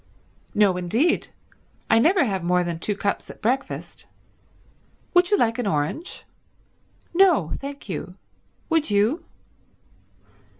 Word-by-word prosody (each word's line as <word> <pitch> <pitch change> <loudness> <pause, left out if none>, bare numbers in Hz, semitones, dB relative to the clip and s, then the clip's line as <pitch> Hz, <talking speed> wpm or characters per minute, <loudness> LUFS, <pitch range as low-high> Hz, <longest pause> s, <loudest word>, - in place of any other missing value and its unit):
"No 200 -3 +4
indeed. 225 - +1 0.6
I 225 - +5
never 345 - +4
have 195 -7 -2
more 180 +1 +2
than 170 -1 -4
two 205 +4 -2
cups 200 -1 -2
at - - -11
breakfast. 255 +5 -3 1.1
Would 355 0 +4
you 410 - +4
like 230 -3 +1
an 240 - -1
orange?" 155 - -2 0.9
"No 340 - +4
thank 280 +1 -8
you. - - -5 0.5
Would 325 -2 +1
you?" 210 +10 +2
225 Hz, 120 wpm, -24 LUFS, -, 1.1 s, I